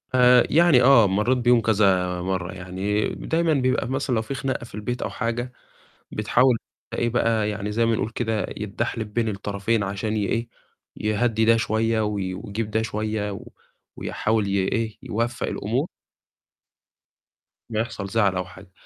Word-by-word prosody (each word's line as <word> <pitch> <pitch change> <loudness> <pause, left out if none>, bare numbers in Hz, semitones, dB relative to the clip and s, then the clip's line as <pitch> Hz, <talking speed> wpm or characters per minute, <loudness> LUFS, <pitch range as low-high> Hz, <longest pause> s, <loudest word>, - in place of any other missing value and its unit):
آآ، 125 -1 +7
يعني 165 -5 +5
آه، 120 -5 +7
مرّيت 105 +7 +1
بيهم 120 -1 +4
كذا 95 -5 +2
مرّة، 95 -1 -2
يعني 95 +3 -2
دايمًا 165 0 0
بيبقى 130 -2 +1
مثلًا 135 -1 -1
لو 110 - +1
في 110 +5 -5
خناقة 135 -2 -3
في - - -12
البيت 120 +4 -4
أو - - -2
حاجة، 120 +1 -3 0.6
بتحاول 120 +3 +3 0.3
في - - -5
إيه 120 - +1
بقى، 115 -2 +1
يعني 105 0 -3
زي 115 +2 +2
ما 115 - +2
نقول 105 - -2
كده، 110 -4 -1
يتدحلب 105 +1 -4
بين 115 -1 +1
الطرفين 100 +2 -1
عشان 100 +2 -2
يإيه، 115 +3 -1 0.5
يهدّي 110 +1 +1
ده 115 +1 +5
شوية 115 0 +1
و 105 -1 0
ويجيب 100 +3 -4
ده 110 +1 +1
شوية 105 0 -2
و 95 - -8 0.5
ويحاول 110 -2 -1
يإيه، 100 +3 -1
يوفَّق 115 +2 -2
الأمور. - - -2 1.8
أمّا 110 - -1
يحصل 110 -3 -3
زعل 100 -2 +2
أو 90 0 -1
حاجة. 95 +1 -14
110 Hz, 155 wpm, -24 LUFS, 100-120 Hz, 1.8 s, آآ